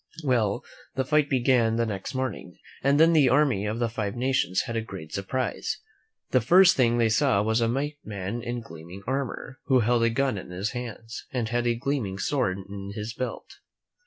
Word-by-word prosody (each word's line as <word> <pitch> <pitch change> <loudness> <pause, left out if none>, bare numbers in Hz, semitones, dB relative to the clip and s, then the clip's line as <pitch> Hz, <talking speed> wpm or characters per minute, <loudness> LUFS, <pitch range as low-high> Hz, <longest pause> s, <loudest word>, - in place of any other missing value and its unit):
Well, 120 -7 +1 0.3
the 130 0 0
fight 150 -1 +2
began 125 -4 +3
the 115 0 +1
next 100 +2 -5
morning, 130 -9 -4 0.3
and 140 +2 +3
then 165 +1 +6
the 145 -5 +5
army 130 -7 +2
of 110 +2 -2
the 120 0 +1
Five 110 -1 -3
Nations 125 -7 +1
had 115 - -5
a 115 - 0
great 95 -8 -9
surprise. 120 +6 -2 0.5
The 130 - +4
first 180 - +6
thing 120 -2 +3
they 115 -1 +3
saw 110 -2 +3
was 110 +2 +1
a 115 - +2
white 145 +4 -2
man 100 +2 -4
in 120 0 -4
gleaming 85 0 -11
armor, 130 0 -3
who 130 -3 +4
held 120 +1 +2
a 115 - +4
gun 130 -2 0
in - - -10
his 95 +4 -3
hands, 120 -2 -7
and 120 -4 -2
had 120 +1 0
a 120 - +2
gleaming 120 -6 -2
sword 100 -4 0
in 100 0 -7
his 110 +1 -4
belt. 130 +2 -6
120 Hz, 195 wpm, -26 LUFS, 105-130 Hz, 0.5 s, then